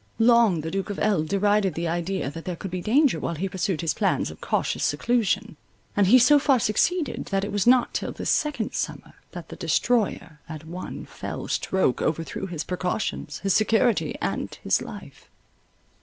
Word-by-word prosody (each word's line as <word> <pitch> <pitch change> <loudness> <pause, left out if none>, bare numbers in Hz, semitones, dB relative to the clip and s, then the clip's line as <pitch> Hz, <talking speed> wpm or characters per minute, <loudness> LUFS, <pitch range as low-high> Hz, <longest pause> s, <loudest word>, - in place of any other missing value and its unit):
Long 230 -7 +4
the 160 +1 -5
Duke 195 +1 -3
of 205 - -4
L——derided 200 0 +1
the 170 +1 -2
idea 175 -2 -2
that 165 +2 -8
there 180 - -3
could 190 +2 -7
be 180 0 -3
danger 270 - +3
while 170 - -3
he 185 +5 -2
pursued 185 -2 -2
his 165 - 0
plans - - 0
of - - -14
cautious - - -1
seclusion; 235 -5 0 0.4
and 205 -2 +3
he 245 +7 +8
so 285 +4 +6
far 275 -2 +3
succeeded, 290 - 0
that 195 -1 -1
it 205 - -3
was 205 +1 0
not 250 0 +4
till - - -2
this - - -2
second 285 -8 -1
summer, - - -4 0.2
that - - -8
the - - -8
destroyer, 190 -9 0
at 160 -1 -8
one 175 +3 -7
fell - - -7
stroke, 190 -9 0
overthrew 165 +4 -2
his 165 -4 -4
precautions, 180 +3 -3
his 195 -1 +1
security, 225 +2 +2
and - - -3
his - - +2
life. - - -10
195 Hz, 180 wpm, -25 LUFS, 175-230 Hz, 0.4 s, he